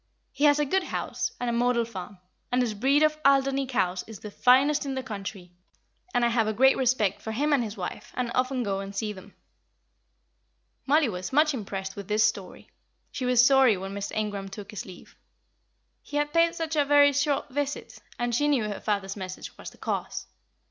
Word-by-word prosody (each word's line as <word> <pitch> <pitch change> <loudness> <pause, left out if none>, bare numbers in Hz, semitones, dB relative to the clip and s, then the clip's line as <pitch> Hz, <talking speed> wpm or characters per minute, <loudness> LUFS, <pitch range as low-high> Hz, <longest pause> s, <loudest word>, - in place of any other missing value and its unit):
He 285 - 0
has 290 0 +6
a 295 - +1
good 375 +6 0
house, - - -3
and 245 - -2
a 235 - 0
model 240 0 +2
farm, 200 -3 -8 0.3
and 250 - +2
his 230 -3 -2
breed 270 +8 +3
of 305 0 +2
Alderney 275 0 +3
cows 185 -8 0
is 220 -2 -9
the 210 - -9
finest 270 +7 +4
in 275 -2 -3
the 260 - -3
country; 195 -4 -7 0.6
and 245 -6 +2
I - - +3
have 230 -2 +1
a 215 - 0
great 265 +4 +5
respect 235 -7 +1
for 220 - -5
him 290 +7 +1
and 270 -4 +3
his 215 -1 -6
wife, - - -6
and 245 -2 -2
often 255 0 0
go 195 -2 -2
and 195 0 -7
see 210 +1 -2
them." 195 +1 -14 1.5
Mollie 295 +1 +4
was 185 -4 -5
much 300 +2 +3
impressed 195 -5 -5
with 200 -2 -8
this 215 +1 +2
story; 205 -4 -2 0.4
she 255 - -4
was 250 -1 +5
sorry 265 -6 +5
when 195 +1 -6
Mr. 200 0 -5
Ingram 205 -2 -3
took 200 0 -9
his 210 - -7
leave. 185 -2 -13 0.9
He 290 - -5
had 295 0 -1
paid 335 0 +3
such 325 -1 -3
a 295 - +4
very 285 0 +5
short 285 +1 0
visit, 285 +1 -4 0.2
and 240 0 -1
she 290 +5 +2
knew 280 -6 +2
her 210 -1 -4
father's 200 -2 -2
message 185 -2 -7
was - - -9
the - - -20
cause. - - -3
240 Hz, 205 wpm, -27 LUFS, 205-280 Hz, 1.5 s, has